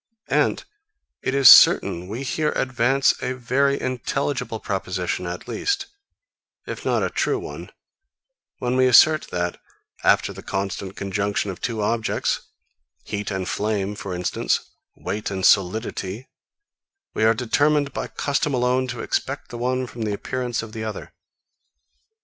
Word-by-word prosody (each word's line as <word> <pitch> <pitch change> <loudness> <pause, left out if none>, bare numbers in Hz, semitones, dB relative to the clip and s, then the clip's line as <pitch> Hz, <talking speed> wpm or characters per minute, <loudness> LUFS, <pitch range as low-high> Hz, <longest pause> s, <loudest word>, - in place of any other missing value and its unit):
And - - +2 0.6
it 130 - -1
is 135 -2 +6
certain 85 -5 +7
we 115 +7 -5
here 150 +3 -1
advance 130 +1 +2
a 130 - -2
very 140 +3 +1
intelligible 130 -1 -2
proposition 90 -3 -3
at 90 +1 -6
least, 395 -1 -1 0.8
if - - -6
not - - +1
a - - -1
true 415 - 0
one, 395 +1 -8 0.9
when 125 0 -1
we 130 0 +4
assert 155 +5 +6
that, 90 0 -3 0.4
after - - +3
the - - -10
constant 95 0 -4
conjunction 100 +1 -1
of 90 - -10
two 110 -3 -2
objects 115 +1 0 0.6
heat 105 -1 -4
and 95 -2 -3
flame, 105 -1 -1
for 100 -3 -6
instance, 90 0 -1 0.2
weight 105 +1 -4
and 95 -1 -2
solidity 100 +3 +1 0.9
we - - 0
are 110 +1 +5
determined 145 +5 +1
by - - -3
custom 140 0 -1
alone 125 +1 +1
to 120 -2 -5
expect - - -3
the 120 - -7
one 130 +1 0
from 120 -1 -9
the 105 -2 -1
appearance 125 +2 -3
of 110 - -9
the 110 - -5
other. 110 -1 -6
115 Hz, 145 wpm, -23 LUFS, 100-130 Hz, 0.9 s, certain